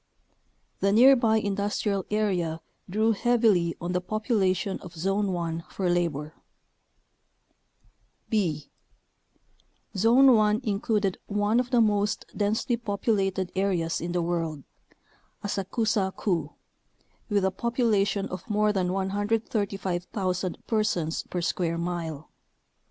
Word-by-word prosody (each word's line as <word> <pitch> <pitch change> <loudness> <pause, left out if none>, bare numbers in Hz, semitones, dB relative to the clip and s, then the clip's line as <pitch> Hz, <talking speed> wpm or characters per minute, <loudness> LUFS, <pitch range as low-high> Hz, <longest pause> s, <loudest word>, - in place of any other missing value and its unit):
The 195 - +2
near 255 +6 +7
by 225 -3 +2
industrial 200 -1 -1
area 185 -7 0 0.3
drew 215 +4 +2
heavily 220 -7 +2
on 175 +1 -3
the 180 0 0
population 195 -2 0
of 175 - -11
Zone 195 +4 0
1 170 -1 -3
for 185 -3 -1
labor. 160 -4 -1 1.9
b. 170 - -1 1.2
Zone 245 +6 +6
1 215 +1 +3
included 205 -2 0
one 205 +3 +1
of 250 0 -1
the 245 -2 +4
most 210 -1 +1
densely 220 +3 0
populated 200 -4 -1
areas 185 -4 0
in 170 +1 -3
the 175 -1 0
world 165 -4 -2 0.4
— - - -36
Asakusa 205 0 -1
Ku 165 -7 -1 0.8
with 200 -2 +2
a 190 - +2
population 210 -2 +1
of 185 +2 -7
more 210 0 +2
than 185 -2 0
135,000 195 -2 -2
persons 195 -8 0
per 180 - -2
square 170 0 -1
mile. 170 -3 -4
195 Hz, 115 wpm, -27 LUFS, 175-215 Hz, 1.9 s, near